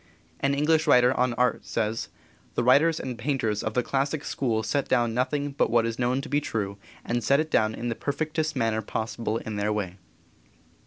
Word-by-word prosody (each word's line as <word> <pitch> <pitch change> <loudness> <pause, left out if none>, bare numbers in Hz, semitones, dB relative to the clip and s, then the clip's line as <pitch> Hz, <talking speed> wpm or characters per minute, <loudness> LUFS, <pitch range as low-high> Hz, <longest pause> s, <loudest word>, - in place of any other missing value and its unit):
An 140 0 +1
English 155 +2 +2
writer 125 -2 +6
on 125 -1 +1
art 125 0 +1
says: 110 0 -2 0.5
"The - - +1
writers 150 +6 +4
and 125 -3 -5
painters 115 -5 -1
of 110 - -3
the 125 - +2
classic 140 +3 -1
school 115 -5 -1
set 140 +6 -1
down 120 -3 +2
nothing 140 +4 -1
but 140 - +1
what 115 -1 +3
is 115 +1 -3
known 125 +2 +1
to - - -8
be 145 +2 +1
true, 100 -7 -3 0.3
and 120 0 -1
set 140 +1 +4
it 155 0 -2
down 110 0 +2
in 120 - -3
the - - 0
perfectest 155 +4 -2
manner 115 -3 0
possible 110 +1 -3
in 110 -2 -5
their 105 +1 0
way." 100 -4 -3
125 Hz, 200 wpm, -26 LUFS, 110-140 Hz, 0.5 s, writer